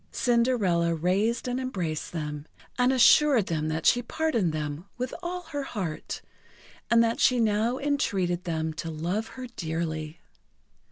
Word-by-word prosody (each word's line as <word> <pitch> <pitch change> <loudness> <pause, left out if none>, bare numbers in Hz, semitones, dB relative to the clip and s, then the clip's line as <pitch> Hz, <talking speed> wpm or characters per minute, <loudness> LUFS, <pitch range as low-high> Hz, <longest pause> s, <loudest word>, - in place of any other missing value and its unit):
Cinderella 220 -9 +2
raised 200 +9 0
and 250 +1 -1
embraced 180 -12 -3
them, 150 -2 -5 0.3
and 250 +1 +3
assured 265 -2 +6
them 155 -3 -1
that 155 0 -2
she 245 - +5
pardoned 240 - 0
them 150 +2 -4
with 250 +1 -3
all 360 +1 -4
her 305 -4 -4
heart, 190 - -5 0.7
and 235 0 +5
that 230 0 0
she 250 -1 +4
now 225 +2 +2
entreated 195 -12 0
them 160 -2 -2
to 165 +1 -5
love 175 +8 -2
her 255 - -5
dearly. 160 -6 -4
200 Hz, 145 wpm, -27 LUFS, 160-250 Hz, 0.7 s, assured